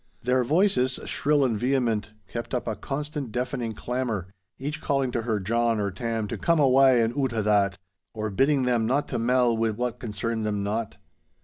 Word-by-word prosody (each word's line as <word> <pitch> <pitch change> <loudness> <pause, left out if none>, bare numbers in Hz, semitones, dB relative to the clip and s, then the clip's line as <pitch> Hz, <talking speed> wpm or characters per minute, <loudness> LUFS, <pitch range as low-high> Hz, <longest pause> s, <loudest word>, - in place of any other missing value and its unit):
Their 125 +1 +2
voices, 150 -3 +2
shrill 145 -1 +2
and 120 -4 +1
vehement, 120 -5 0 0.2
kept 120 +2 -4
up 125 - -3
a 110 - -1
constant 145 +3 -4
deafening 125 -1 -2
clamour, 115 -6 -3 0.3
each 145 +3 -4
calling 135 -3 0
to 120 - -1
her 110 -2 -1
John 115 +3 +1
or 100 -1 -1
Tam 115 +2 -2
to - - -4
'come 170 -1 +2
awa' 135 -1 +6
in 115 +1 0
oot 130 -4 0
o' 110 -2 0
that,' 100 -2 +2 0.4
or 110 -1 -3
bidding 135 +5 +2
them 120 -3 +1
'not 140 +4 +1
to - - -2
mell 120 0 +3
wi' 115 0 +1
what 120 +2 -3
concerned 110 0 -3
them 105 -2 -1
not. 110 +2 -3
120 Hz, 190 wpm, -26 LUFS, 110-130 Hz, 0.4 s, awa